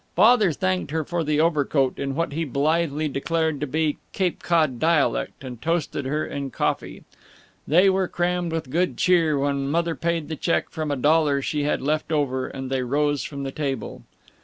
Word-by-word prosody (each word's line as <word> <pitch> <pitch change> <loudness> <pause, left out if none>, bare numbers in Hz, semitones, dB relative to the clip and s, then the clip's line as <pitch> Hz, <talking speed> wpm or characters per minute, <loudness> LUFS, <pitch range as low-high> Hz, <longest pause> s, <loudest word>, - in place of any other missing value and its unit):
Father 220 -5 +5
thanked 95 - -1
her 160 +1 -1
for 170 +2 -2
the 150 -1 0
overcoat 145 -4 +1
in 135 -1 -2
what 165 0 -1
he 160 +3 -2
blithely 155 +2 0
declared 160 +2 -1
to 150 - -2
be 155 +1 0 0.2
Cape 185 -3 -1
Cod 155 -8 +1
dialect, 160 -3 +1
and 125 -3 -8
toasted 165 -4 -1
her 150 +3 -1
in 140 -1 -4
coffee. - - -2 0.6
They 180 +6 +5
were 190 -1 +2
crammed 175 -1 -1
with 160 -5 -4
good 180 +4 0
cheer 165 -5 +3
when 140 0 0
Mother 170 +2 +1
paid 165 -2 -2
the 160 - -4
check 165 - -1
from 155 -2 -3
a 145 - 0
dollar 145 +1 +3
she 145 0 -1
had 145 - 0
left 155 +3 -1
over, 130 -4 0
and 135 0 -6
they 130 -1 0
rose 145 +3 0
from 140 -2 -6
the 135 - -3
table. 135 -5 -4
150 Hz, 185 wpm, -24 LUFS, 140-165 Hz, 0.6 s, Father